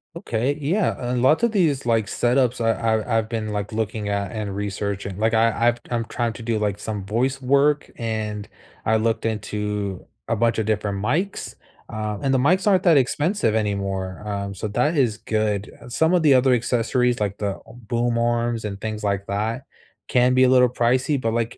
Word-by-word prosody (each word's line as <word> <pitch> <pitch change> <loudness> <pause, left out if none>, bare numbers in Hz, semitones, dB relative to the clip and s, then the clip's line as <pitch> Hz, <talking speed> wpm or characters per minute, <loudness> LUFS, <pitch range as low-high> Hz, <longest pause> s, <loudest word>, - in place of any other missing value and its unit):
Okay, 125 -4 -1
yeah, 185 +9 +1 0.2
a - - 0
lot 130 - +3
of 235 -1 +2
these 150 - +1
like 115 -3 +2
setups 125 +3 +1
I 115 - +2 0.3
I 115 - 0
I've 110 -1 -1
been 110 -2 -3
like 105 -1 -3
looking 110 -1 -2
at 100 -1 -2
and 105 -3 -4
researching. 100 -1 -3
Like, 110 +1 +1
I 115 +1 +3
I - - +2 0.2
I'm 115 -2 -1
trying 120 -1 -2
to 115 - -9
do, 110 -1 -1
like, 105 -2 -1
some 105 -1 -5
voice 125 +7 -1
work, 140 +3 +2
and 110 -3 -3 0.4
I 110 0 +3
looked 115 +1 0
into 105 -3 -3 0.2
a 115 - +1
bunch 115 +1 +1
of 110 - -1
different 100 -2 -1
mics, 180 - -2 0.3
um, 105 -1 -4
and 135 - +1
the 135 - +3
mics 180 +10 +2
aren't 190 -3 +4
that 170 -4 +5
expensive 140 - +1
anymore, 100 -3 -2
um, 100 -1 -4
so 100 +3 -4
that 150 +10 0
is 120 -7 +2
good. 110 -2 -1 0.2
Some 160 +7 +2
of 180 - +4
the 145 -4 +5
other 130 0 +4
accessories, 125 +1 +1
like 100 -1 -2
the 100 -2 -2
boom 120 +1 -2
arms 120 -1 0
and 100 -2 -5
things 110 0 -5
like 100 -1 -1
that, 110 +6 -2 0.5
can 125 0 +3
be 130 - +5
a 130 - +5
little 125 -1 +5
pricey, 125 +4 +1
but 115 -2 -1
like 115 0 -2
115 Hz, 195 wpm, -23 LUFS, 105-125 Hz, 0.5 s, that